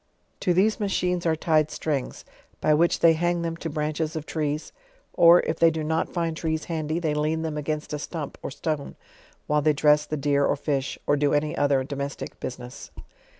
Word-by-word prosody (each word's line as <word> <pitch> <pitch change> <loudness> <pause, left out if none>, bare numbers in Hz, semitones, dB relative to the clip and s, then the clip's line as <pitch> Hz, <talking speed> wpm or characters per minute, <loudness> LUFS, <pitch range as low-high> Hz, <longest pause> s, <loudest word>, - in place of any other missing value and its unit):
To 180 - +1
these 200 +6 +3
machines 180 -4 0
are 160 - +3
tied 155 -1 +2
strings, 145 -5 -3 0.3
by 155 - +3
which 170 +3 +2
they 165 -1 +7
hang 175 +1 0
them 165 0 -2
to 165 - -5
branches 155 +1 -2
of 155 -1 -4
trees; 150 -1 -3 0.4
or, 170 +1 +7
if 160 - -3
they 165 - +6
do 160 -1 -3
not 160 +1 0
find 165 -2 -2
trees 160 -1 -2
handy, 160 -1 -2
they 160 -3 0
lean 155 +2 0
them 160 -2 -3
against 150 0 -3
a 150 - -2
stump 150 -1 -6
or - - -4
stone 145 +1 -4 0.5
while 150 0 +1
they 155 +1 +3
dress 150 +1 +3
the 155 - -2
deer 140 0 +2
or - - +2
fish 140 -2 -2
K - - -30
or 145 - +3
do 145 0 +2
any 150 +1 0
other 140 -2 +2
domestic 140 0 -5
business. 125 0 -7
155 Hz, 200 wpm, -25 LUFS, 145-165 Hz, 0.5 s, they